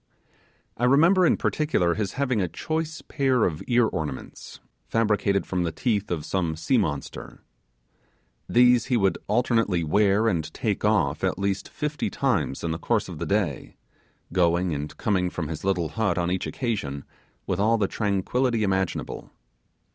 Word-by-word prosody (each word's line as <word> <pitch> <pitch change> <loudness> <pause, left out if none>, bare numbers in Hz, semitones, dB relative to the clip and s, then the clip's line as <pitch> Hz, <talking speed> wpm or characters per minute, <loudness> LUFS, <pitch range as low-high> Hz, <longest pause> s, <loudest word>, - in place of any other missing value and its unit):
I 120 - +1
remember 165 +8 +5
in - - +3
particular 150 - +1
his 105 0 -3
having 130 -5 0
a 90 - 0
choice 160 - -4
pair 130 -5 +2
of 80 -4 -2
ear 120 -1 +4
ornaments, 75 -10 -5 0.3
fabricated 105 - +1
from 90 -1 -2
the 85 -1 -1
teeth 105 +3 -1
of 80 -4 -3
some 85 -4 -1
sea 80 +11 +1
monster. 75 -9 -4 1.1
These 125 0 +5
he 125 - +1
would 95 -3 +1
alternately 115 -5 +1
wear 100 +6 +3
and 80 -7 -1
take - - -2
off - - +1
at - - 0
least 100 0 -2
fifty 150 0 -3
times 95 - -1
in 85 - -1
the 80 - -3
course - - 0
of - - -8
the - - -3
day, - - -1 0.6
going 85 -1 +2
and 75 +1 -5
coming 95 -4 +1
from 80 -4 -4
his 80 - -5
little 90 -4 0
hut 100 0 0
on 85 0 0
each 95 - -1
occasion 95 - -3 0.4
with 95 - -2
all 110 +3 +3
the 100 -3 +1
tranquillity 110 +4 0
imaginable. 95 -2 -2
100 Hz, 160 wpm, -25 LUFS, 85-120 Hz, 1.1 s, remember